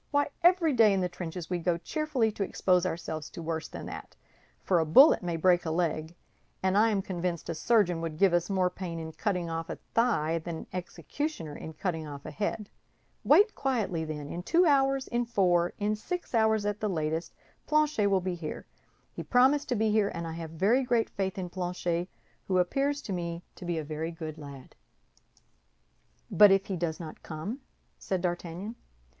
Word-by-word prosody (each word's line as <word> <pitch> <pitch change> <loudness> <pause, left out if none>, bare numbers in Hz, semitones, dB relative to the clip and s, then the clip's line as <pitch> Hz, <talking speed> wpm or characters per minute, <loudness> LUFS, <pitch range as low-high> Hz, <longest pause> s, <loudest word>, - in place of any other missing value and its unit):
Why, 285 -1 +1
every 345 -3 +4
day 220 -4 +5
in 190 - +1
the 180 - +1
trenches 175 -1 -6
we 180 - 0
go 170 0 +1
cheerfully 255 - -1
to 210 - -8
expose 185 -2 +2
ourselves 160 -2 -4
to - - -8
worse 160 0 -3
than - - -8
that—for 180 -3 -4
a - - +3
bullet 260 - +7
may 175 -2 -2
break 175 +1 +3
a 160 - -3
leg, 160 0 -1 0.5
and 190 0 +2
I 220 +2 +5
am 200 -3 0
convinced 175 -3 -3
a - - 0
surgeon 180 -1 +2
would 165 -2 -4
give 195 0 +4
us 175 +1 +1
more 185 -2 +1
pain 175 -3 -5
in 160 -1 -6
cutting 180 -1 -2
off 165 0 -4
a - - -3 0.2
thigh 165 -9 +2
than 165 +1 -5
an - - -9
executioner 180 - -4
in 160 - -8
cutting 160 -1 -3
off 140 -1 -9
a - - -6
head. 210 0 -3 0.5
Wait 420 +2 +5
quietly, 215 -11 -1
then; 150 -2 -5
in 170 - -5
two 345 - +3
hours, 270 -3 +3
in 240 0 0
four, 180 -6 +2
in 210 +1 0
six 350 +12 -5
hours 220 -2 +3
at 205 +1 -2
latest, 160 -5 -2 0.3
Planchet 300 -9 +2
will 195 -2 +2
be 185 0 -2
here. 165 -3 -6 0.5
He - - -6
promised 270 +4 +3
to 245 - +1
be 220 0 +1
here, 210 -1 +3
and 170 - -4
I 165 - -4
have 165 0 -6
very 195 +11 +2
great 240 -3 +1
faith 190 -1 -2
in 180 -2 -4
Planchet, 175 -1 -2 0.4
who 185 - +1
appears 275 +11 +1
to 200 - -4
me 170 -1 -4
to 180 - -10
be 175 -1 -1
a 160 - -2
very 155 +2 -4
good 160 -2 -7
lad." 140 -3 -11 1.6
"But 210 -1 +8
if 195 0 +3
he 195 - -3
does 165 -2 -2
not 160 -3 -8
come?" 175 - -5 0.4
said 190 -2 -2
D'Artagnan. 175 +4 -4
180 Hz, 195 wpm, -29 LUFS, 165-220 Hz, 1.6 s, But